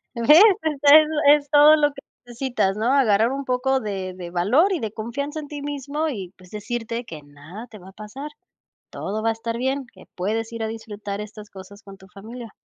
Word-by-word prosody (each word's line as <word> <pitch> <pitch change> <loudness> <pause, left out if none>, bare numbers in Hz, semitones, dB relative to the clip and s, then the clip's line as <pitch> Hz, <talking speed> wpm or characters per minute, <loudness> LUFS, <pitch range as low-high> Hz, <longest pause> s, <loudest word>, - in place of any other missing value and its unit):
Ves, 295 - +6 0.2
esta 290 -2 +2 0.5
es 290 -1 -9
todo 300 +1 +7
lo 295 -1 +2
que 245 -3 -16
sitas, 235 -6 -1
¿no? 230 +5 0
Agarrar 230 -3 +3
un 275 0 -4
poco 260 +1 0
de 190 -4 -5
de 175 -2 -8
valor 230 - +2
y 355 - -1
de 215 -2 -4
confianza 280 +8 -5
en 290 - -10
ti 290 -1 -7
mismo 290 +2 -3
y, 195 - -6
pues, 180 -1 -18
decirte 230 +2 -5
que 160 -7 -10
nada 145 +10 -12
te 215 - -13
va 185 +1 -14
a - - -20
pasar. 215 +9 -9 0.6
Todo 215 +3 -5
va 225 - +2
a - - +2
estar 230 +1 -5
bien, 265 +2 -2
que 185 - -17
puedes 220 +5 -3
ir 230 -1 -4
a - - -1
disfrutar 210 -2 -6
estas 210 0 -10
cosas 195 +2 -13
con 195 -2 -13
tu 190 0 -17
familia. 225 +3 -11
225 Hz, 210 wpm, -22 LUFS, 200-275 Hz, 0.6 s, todo